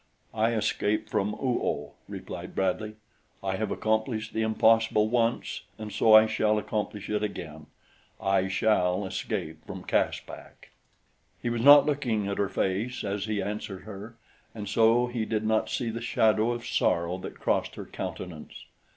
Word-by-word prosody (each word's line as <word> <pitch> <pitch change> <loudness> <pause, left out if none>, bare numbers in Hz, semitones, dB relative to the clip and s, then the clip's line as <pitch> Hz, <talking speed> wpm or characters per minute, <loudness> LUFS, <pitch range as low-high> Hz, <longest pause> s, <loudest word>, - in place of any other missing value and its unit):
"I 110 +1 +1
escaped 110 0 0
from 105 +2 0
Oo 125 -2 -1
oh," 70 0 -2 0.2
replied - - -7
Bradley. 105 +3 -1 0.5
"I 95 -1 -1
have 110 - -2
accomplished 110 0 -1
the 110 - -1
impossible 110 -1 +3
once, 115 0 0 0.2
and 110 -1 -7
so 110 -1 +6
I 110 0 +9
shall 110 -1 +1
accomplish 105 -1 -3
it 105 - -1
again 80 -7 -5 0.5
I 95 -1 +1
shall 95 -1 +1
escape 80 -4 -4
from - - -7
Caspak." - - -3 0.7
He 120 - -2
was 120 -1 -1
not 145 +2 +9
looking 125 -9 0
at 100 - -3
her 100 -1 +1
face 100 +8 -1
as 100 0 -2
he 105 -2 -1
answered 100 -2 -5
her, 110 +2 -9 0.4
and 105 -2 -6
so 115 +3 +4
he 120 -2 -3
did 110 -1 -1
not 110 0 +1
see 120 -3 -2
the 115 +1 -5
shadow 110 -1 +2
of 120 -1 -4
sorrow 85 +2 0
that - - -8
crossed - - 0
her - - -7
countenance. 85 -4 -7
110 Hz, 160 wpm, -28 LUFS, 100-115 Hz, 0.7 s, I